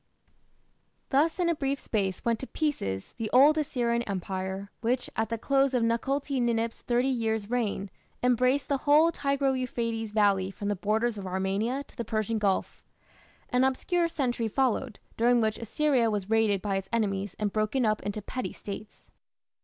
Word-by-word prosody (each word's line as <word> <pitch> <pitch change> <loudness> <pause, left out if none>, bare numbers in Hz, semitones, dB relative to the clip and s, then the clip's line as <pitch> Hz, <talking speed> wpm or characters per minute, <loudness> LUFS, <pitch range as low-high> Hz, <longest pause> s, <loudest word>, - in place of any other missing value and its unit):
Thus 305 +5 +2
in 355 - +2
a 340 - +3
brief 275 -2 -1
space 195 -1 -2
went 230 -2 +1
to 265 - -5
pieces 100 - -2
the 220 -2 -2
old 285 +5 +6
Assyrian 240 -5 0
Empire, 190 +1 -4
which, 245 +2 -1
at 225 - 0
the 230 - -1
close 275 +2 +2
of 240 - +2
Tukulti 270 +4 0
Ninip's 230 -1 0
thirty 245 +2 +1
years' 220 -4 -1
reign, 210 -5 -1 0.3
embraced 255 +3 +2
the 280 - +1
whole 305 +4 +5
Tigro 275 -3 0
Euphrates 230 -4 -2
valley 200 -3 +2
from 200 +1 -5
the 205 - +1
borders 215 +3 0
of 190 - -6
Armenia 195 +8 -1
to - - -21
the 235 - -3
Persian 220 0 -1
Gulf. 200 -2 -1 0.7
An 250 +1 +2
obscure 335 +6 +1
century 245 -7 -1
followed, 255 0 0 0.2
during 240 +1 +4
which 220 -1 0
Assyria 245 +1 +1
was 205 -1 -3
raided 215 -4 +2
by 200 -2 0
its 190 0 -5
enemies 200 -4 -1
and 210 -2 -1
broken 215 +4 +1
up 215 0 +1
into 205 +1 -4
petty 255 +4 -4
States. 210 +1 -9
230 Hz, 170 wpm, -28 LUFS, 205-265 Hz, 0.7 s, old